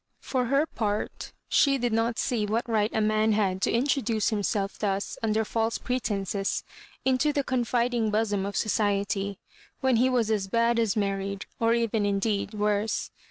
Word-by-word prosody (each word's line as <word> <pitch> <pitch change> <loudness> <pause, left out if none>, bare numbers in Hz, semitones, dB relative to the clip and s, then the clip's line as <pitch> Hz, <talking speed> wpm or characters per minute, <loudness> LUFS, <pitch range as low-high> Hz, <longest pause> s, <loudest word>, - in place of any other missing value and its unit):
For 255 -2 -1
her 275 +5 +2
part, 210 -8 -3 0.2
she 275 -1 +4
did 245 -3 -1
not 225 +1 +1
see 220 -4 0
what 230 +4 -1
right 215 -2 +1
a - - -2
mafi 215 +1 +2
had 190 -3 0
to - - +2
introduce 240 -3 +1
himself 205 -1 -1
thus 200 -1 -1
under 220 -1 +1
false 225 +1 0
pre 250 0 -2
tences 200 -3 -2 0.4
into 265 +3 +3
the 285 -1 0
confiding 240 -2 0
bosom 210 -2 0
of 200 0 -4
society 200 -2 0 0.2
— - - -28
when 260 -3 +3
he 255 +3 +4
was 235 -4 +1
as 205 -3 0
bad 230 +3 +2
as 225 -4 +1
married, 200 -1 -2
or 230 0 +3
even 230 -2 0
indeed 200 +1 -1
worse. 210 +1 0
220 Hz, 170 wpm, -27 LUFS, 205-235 Hz, 0.4 s, she